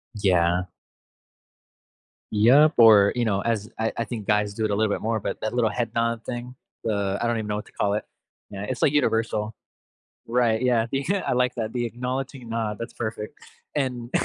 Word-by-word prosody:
Yeah. 90 -3 +2 1.7
Yep, 130 +9 +6
or 105 -3 +7
you 120 - +1
know, 100 -3 +1
as 110 -2 -1
I 110 - 0
I 115 - 0
think 110 -3 -6
guys 105 -1 +1
do 110 +1 -1
it 105 - 0
a - - +1
little 110 -1 +1
bit - - -3
more, 110 0 0
but - - -4
that 110 +2 -2
little 120 -3 +2
head 115 -1 -2
nod 115 0 0
thing, 125 +1 -6 0.3
the 100 -3 0
I - - 0
don't 120 -1 +1
even 110 -1 -3
know 105 - -1
what 105 - -5
to - - -17
call 100 0 0
it. 105 - -1 0.5
Yeah, 100 -1 -6
it's 120 +1 -4
like 145 - +4
universal. 110 -5 0 0.7
Right, 115 -1 +2
yeah. 120 -3 +2
becau 170 +9 0
I - - +1
like 125 0 +1
that, 110 -1 -3
"the 120 -1 -1
acknowledging 125 +1 -4
nod," 110 -2 -2
that's 115 - -7
perfect, 110 -2 -5 0.4
and 125 -4 -2
115 Hz, 200 wpm, -25 LUFS, 105-120 Hz, 1.7 s, or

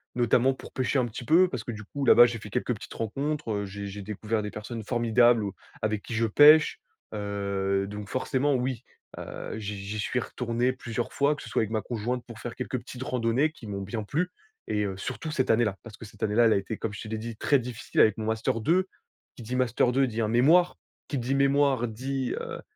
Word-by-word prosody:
Notamment 125 +2 +3
pour - - -12
pêcher, 130 +1 0
un 120 - +1
petit 120 +2 -7
peu 175 +6 +5
parce 125 -4 -4
que 120 - -5
du 110 0 -7
coup, 140 +6 -4
là-bas, 120 -1 +8
j'ai 120 -1 -4
fait 105 -1 -10
quelques 125 +1 -1
petites - - -10
rencontres. 140 +4 -3
Heu, 100 -1 -1
j'ai 100 +1 -6
j'ai 100 +1 -7
découvert 110 +2 -2
des 105 - -4
personnes 110 +1 -6
formidables 120 0 +3
ou, 100 -2 -3 0.3
avec 110 -1 -1
qui - - -7
je 115 0 +1
pêche. 150 +7 +7 0.4
Heu, 100 -1 -1
donc 105 0 -7
forcément 135 +2 0
oui, 125 -2 -1 0.3
heu, - - -6
j'y 105 -1 -4
j'y 100 +2 -5
suis 125 +4 0
retourné 120 +1 -1
plusieurs 120 -2 -4
fois, 145 +2 +2
que - - -10
ce 115 - -9
soit - - +1
avec 110 0 -2
ma 110 - 0
conjointe 120 +2 -3
pour 115 -2 -10
faire 120 0 -6
quelques 130 0 -3
petites 125 +1 -10
randonnées, 130 +3 +1
qui 155 - -13
m'ont 100 -2 -4
bien 105 +3 -4
plu 165 - -1 0.4
et 105 0 0
heu, 95 - -3
surtout 130 +9 -5
cette 130 -4 0
année-là, 110 -3 +2
parce 115 -3 -10
que - - -10
cette 105 - -16
année-là, 110 +3 +3
elle 110 - +5
a - - +3
été 100 +3 -4
comme 110 - -4
je 100 - -7
te - - -7
l'ai 110 0 -3
dit 115 0 -6
très 140 - +3
difficile 120 -2 -4
avec 110 - +4
mon 110 - -3
Master 110 0 0
2. 185 - +2 0.5
Qui - - -11
dit 120 +3 -4
Master 125 -1 +2
2 135 +2 +3
dit 115 -1 -3
un 110 - +1
mémoire. 155 +11 +4 0.3
Qui 145 - -2
dit 125 +2 -1
mémoire 140 -3 +3
dit, 130 +3 -3
heu, - - -6
115 Hz, 235 wpm, -27 LUFS, 105-130 Hz, 0.5 s, là-bas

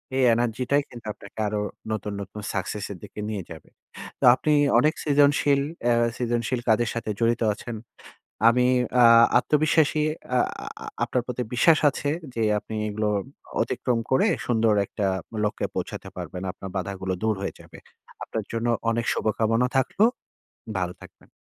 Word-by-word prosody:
এই 130 - +2
এনার্জি 120 +1 0
টাই 145 - +5
কিন্তু 120 -2 -12
আপনাকে 105 - -15
আরো 105 0 -1 0.3
নতুন, 105 -1 -3
নতুন 100 +2 -8
সাকসেস 105 +1 -3
এর 95 - -7
দিকে - - -10
নিয়ে 105 -3 -3
যাবে। 80 -2 -11 0.5
তো - - -7
আপনি 150 +3 +1 0.3
অনেক 155 +1 +3
সৃজনশীল 145 -1 +3 0.3
এ - - +4 0.2
সৃজনশীল 120 0 -1
কাজের 115 +1 +3
সাথে 115 -2 -4
জড়িত 115 0 +1
আছেন। 115 +2 -7 0.7
আমি 125 +1 +4 0.4
আ - - +7 0.3
আত্মবিশ্বাসী 150 +2 +2 0.3
আ - - +4 0.3
আ - - -9 0.2
আপনার 125 - -1
প্রতি 125 0 -3
বিশ্বাস 155 +6 +5
আছে 145 +1 -3 0.2
যে, 115 - -1 0.2
আপনি 110 - -8
এগুলো 105 0 -1 0.5
অতিক্রম 120 -2 -1
করে 130 - +4 0.2
সুন্দর 115 -2 +3
একটা 105 - -2 0.4
লক্ষ্যে 105 - -1
পৌঁছাতে 95 - -5
পারবেন। 90 0 -6
আপনার 95 0 -9
বাধাগুলো 95 0 -3
দূর 110 -1 +2
হয়ে 100 - -3
যাবে। - - -14 0.5
আপনার 110 -2 -4
জন্য 115 +1 -2 0.2
অনেক 115 0 0
শুভকামনা 115 +2 +1
থাকলো। 135 - +2 0.7
ভালো 90 -1 -2
থাকবেন। - - -16
115 Hz, 150 wpm, -25 LUFS, 105-125 Hz, 0.7 s, আ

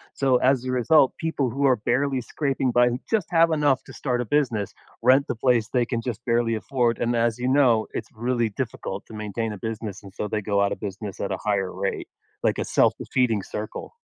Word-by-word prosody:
so 130 -2 +3
as 130 0 +2
a 130 - -2
result, 130 +3 +4
people 150 -6 -1
who 140 +4 0
are 130 - +5
barely 130 +4 0
scraping 135 0 -1
by 120 0 +4
who 120 +1 -3
just 215 -7 0
have 165 -1 +4
enough 145 -4 +2
to - - -13
start 125 -3 -2
a 125 - -1
business, 115 -6 0 0.3
rent 130 +3 +5
the - - -2
place 115 -1 +2
they 125 -2 +2
can 115 -1 -2
just 120 -1 -5
barely 115 -1 +1
afford, 120 +1 0
and 120 0 0
as 115 0 +1
you 125 - -2
know, 130 -5 +4
it's 110 - -5
really 120 0 0
difficult 105 -3 -5
to - - -13
maintain 110 +1 -3
a - - -7
business, 110 -2 -5
and 100 - -12
so 105 - -3
they 105 0 -2
go 100 0 0
out 100 0 +2
of - - -4
business 100 0 -6
at 100 - -3
a - - -1
higher 100 -3 -1
rate, - - -3 0.3
like - - +1
a - - -2
self-defeating 115 -6 +1
circle. 105 - -6
120 Hz, 220 wpm, -24 LUFS, 110-130 Hz, 0.3 s, are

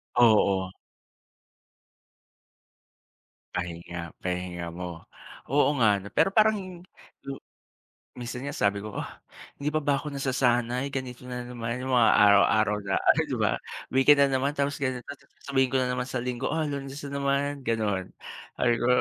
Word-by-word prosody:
Oo. 100 -5 +4 2.8
Pahinga, 85 -1 -5
pahinga 90 -2 -4
mo. 85 -1 -7 0.4
Oo 145 +3 +3
nga, 105 -5 +3
ano? 100 - -9
Pero 195 - +4
parang 215 0 +4
hin 185 -2 -7 0.5
lo 135 0 -6 0.8
minsan 120 0 -6
nga 140 - -4
sabi 100 0 +1
ko, 105 0 -7
"Ah, - - -6 0.4
hindi 145 +1 -1
pa 155 - +1
ba 140 -1 +2
ako 145 +1 -6
nasasanay 125 0 0
ganito 125 -2 -5
na 125 -1 -5
naman 120 0 -5
yung 130 - -3
mga 115 - +6
araw-araw 105 +1 +5
na 95 - 0
ano, - - +4
di - - -3
ba, - - +2 0.4
weekend 140 +2 +5
na 140 - +5
naman 140 +2 -1
tapos 140 -1 -1
ganito," 130 -3 -2 0.4
sabihin 135 -2 +1
ko - - +5
na 125 - 0
naman 125 0 -2
sa 130 -2 -3
Linggo, 125 +1 -3
"Ah, 160 - 0
Lunes 140 0 -6
na 140 - -6
naman," 140 0 -1
gano'n. 105 -5 -1 0.4
Sabi 120 -1 +2
ko 120 - -1
125 Hz, 155 wpm, -27 LUFS, 105-140 Hz, 2.8 s, mga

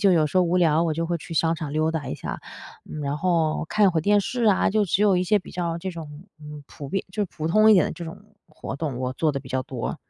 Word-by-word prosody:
就 195 -3 +5
有 160 -3 +3
时 150 - -4
候 185 - +6
无 175 +1 +1
聊， 165 -1 +3
我 160 - 0
就 165 +1 -2
会 175 - -1
去 165 +1 -9
商 165 +1 +2
场 155 -3 -5
溜 155 +1 +1
达 160 -3 -4
一 - - -3
下， - - -6 0.4
嗯， 155 - -7
然 140 0 -2
后 165 -3 +1
看 210 -2 +4
会 165 - 0
儿 - - +2
电 205 +5 +3
视 240 +4 -2
啊， 205 -3 +3
就 210 +1 +2
只 195 +2 +1
有 200 -3 +4
一 180 - +1
些 210 +3 +3
比 - - -12
较 170 -1 -3
这 190 +2 -4
种， 160 -2 -9 0.2
嗯， 150 -1 -9
普 140 - -9
遍 195 +6 -2
就 210 +3 -2
是 185 - -10
普 155 0 -3
通 215 +5 +5
一 - - +8
点 185 - +4
的 - - -4
这 170 - -7
种 165 +4 -9 0.2
活 155 -3 -7
动， 140 -4 -3
我 130 0 -2
做 155 +2 +1
得 140 - -3
比 135 - -13
较 130 0 -1
多。 130 -2 -4
165 Hz, 320 characters per minute, -24 LUFS, 150-185 Hz, 0.4 s, 一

